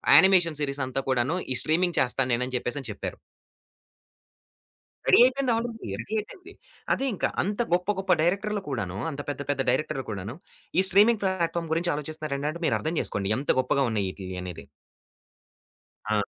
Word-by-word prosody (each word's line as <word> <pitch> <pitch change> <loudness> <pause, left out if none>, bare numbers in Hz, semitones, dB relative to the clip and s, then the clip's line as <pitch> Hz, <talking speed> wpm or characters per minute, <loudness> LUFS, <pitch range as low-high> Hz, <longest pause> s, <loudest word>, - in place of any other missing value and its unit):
Animation 180 -5 +6
సీరీసంతా 140 -2 -2
కూడాను, 130 +5 +1 0.2
ఈ - - +1
"streaming 175 +4 +1
చేస్తా 130 +1 +1
నేనని" 125 +2 0
చెప్పేసని 125 0 -4
చెప్పారు. 100 - -6 1.9
రెడీ - - +6
అయిపోయింది. 260 0 +1
ఆల్రెడీ 230 - -5
రెడీ 120 - -8
అయిపోయింది. 215 - -10 0.4
అదే 270 - -1
ఇంకా 195 - 0 0.2
అంత 205 +4 -3
గొప్ప, 180 +2 +1
గొప్ప 190 -1 -1
డైరెక్టర్‌లు 200 +5 0
కూడాను, 100 -9 -3
అంత 145 0 -5
పెద్ద, 145 - -4
పెద్ద 140 -1 -1
డైరెక్టర్‌లు 135 -4 0
కూడాను 100 +4 -5 0.4
ఈ - - +5
స్ట్రీమింగ్ 210 +3 +5
ప్లాట్‌ఫార్మ్ 170 -3 -1
గురించి 170 +2 0
ఆలోచిస్తున్నారంటే, 150 +1 -4
మీరర్థం 160 +2 0
చేసుకోండి 100 +1 0
ఎంత 140 - +1
గొప్పగా 135 +1 +1
ఉన్నాయి 105 -3 0
ఈటిలియి 95 -1 -7
అనేది. 90 -2 -7 1.4
ఆ! 105 -1 +2
150 Hz, 145 wpm, -26 LUFS, 125-185 Hz, 1.9 s, Animation